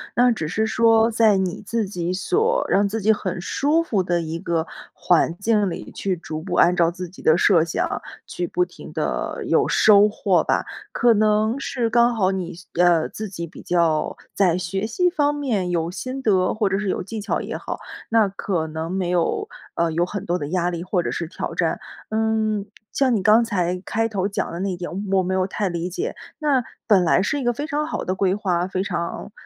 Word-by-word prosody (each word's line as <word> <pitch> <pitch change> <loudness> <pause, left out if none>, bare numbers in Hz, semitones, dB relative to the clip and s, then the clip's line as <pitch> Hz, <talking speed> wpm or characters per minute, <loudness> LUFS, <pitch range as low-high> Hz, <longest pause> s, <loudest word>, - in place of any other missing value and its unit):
那 245 0 +5
只 160 -9 -2
是 220 +7 0
说 225 0 +4
在 220 -3 +4
你 185 0 -2
自 220 0 -1
己 180 -2 -3
所 445 - +1
让 200 +1 +3
自 220 +2 -3
己 220 +2 +4
很 185 -4 -2
舒 295 - +1
服 210 - 0
的 175 -1 0
一 165 0 -4
个 170 -2 -1 0.3
环 170 -1 +2
境 210 -1 +2
里， - - -7
去 190 -2 -2
逐 155 -2 -6
步 175 0 -4
按 180 - +5
照 170 -2 +3
自 180 0 -7
己 185 - -14
的 160 +2 +4
设 175 -4 +4
想， 170 - -2 0.2
去 175 -1 -4
不 180 - +1
停 180 - -10
地 - - -2
有 - - +2
收 210 -1 +6
获 200 -3 +1
吧。 - - 0 0.3
可 240 -1 +4
能 215 +3 +2
是 245 -4 -1
刚 235 +1 +3
好 195 -3 +2
你 185 -2 -4 0.3
呃， 175 -2 +4
自 215 - -6
己 170 -2 -6
比 - - -12
较 165 -3 +1 0.2
在 180 -4 +2
学 190 +4 -2
习 360 +10 +2
方 295 -4 +1
面 225 -11 -1
有 170 0 -1
心 255 +7 -5
得， 190 -6 +2
或 215 -2 0
者 195 +1 0
是 210 - -2
有 - - -1
技 220 +3 -6
巧 210 - -2
也 - - -5
好， - - -6 0.3
那 225 -2 +4
可 180 -4 -2
能 160 +2 -5
没 185 -2 -1
有， 180 - 0 0.3
呃， 170 -1 +1
有 170 +2 +1
很 200 +1 -5
多 175 -1 0
的 145 - -4
压 175 0 0
力 170 -1 -4
或 180 -1 0
者 - - -2
是 170 - -3
挑 165 - -5
战。 - - 0 0.3
嗯， 220 -2 0 0.3
像 260 -3 +2
你 205 - 0
刚 220 +4 +5
才 180 -4 -1
开 225 +1 0
头 195 -3 -1
讲 200 - -3
的 170 - -5
那 195 +1 -1
一 180 - -4
点， 175 -2 -5 0.2
我 190 - +4
没 185 - -2
有 185 - +2
太 195 +1 -2
理 170 0 -3
解。 395 - -4 0.2
那 285 -5 +2 0.2
本 195 -5 +5
来 170 +2 +3
是 245 +8 0
一 270 - -3
个 240 0 +1
非 290 +6 -4
常 300 0 -1
好 320 - -3
的 185 - -2
规 190 -1 +1
划， 185 -3 0
非 185 0 -2
常 180 +1 -4
195 Hz, 235 characters per minute, -22 LUFS, 175-220 Hz, 0.3 s, 收